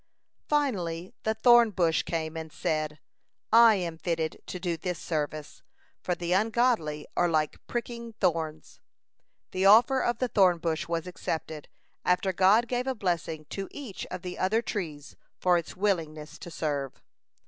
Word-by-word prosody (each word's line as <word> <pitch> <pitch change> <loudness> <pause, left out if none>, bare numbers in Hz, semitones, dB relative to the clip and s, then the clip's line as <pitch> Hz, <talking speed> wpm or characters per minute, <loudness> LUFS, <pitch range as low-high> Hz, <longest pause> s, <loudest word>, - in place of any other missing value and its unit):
Finally 185 - -1
the 220 0 0
thorn 240 0 +6
bush 170 -5 +2
came 160 -1 -3
and 160 -1 -6
said: 155 -1 -2 0.6
"I 230 -1 +8
am 170 -4 -3
fitted 165 -2 -2
to 180 - -5
do 175 -1 -1
this 175 +2 -4
service, 155 -2 -4 0.4
for 180 - -1
the 175 0 -4
ungodly 215 -7 +1
are 175 - +2
like 155 -2 0
pricking 235 -1 -5
thorns." 160 -7 -2 0.7
The 190 +1 +2
offer 245 +6 +6
of 240 - 0
the 255 - 0
thorn 185 -6 +4
bush 165 +1 -2
was 165 -1 -2
accepted, 160 -4 -5 0.4
after 180 +1 +1
God 200 +6 +4
gave 250 +1 -2
a 265 - 0
blessing 170 -6 -2
to 195 -1 -4
each 255 -10 -7
of 185 -1 -7
the 180 -1 -6
other 220 +5 +1
trees 155 -10 -5 0.2
for 180 -1 +3
its 170 0 -3
willingness 165 -6 -2
to - - -8
serve. 145 -5 -3
180 Hz, 155 wpm, -28 LUFS, 160-215 Hz, 0.7 s, I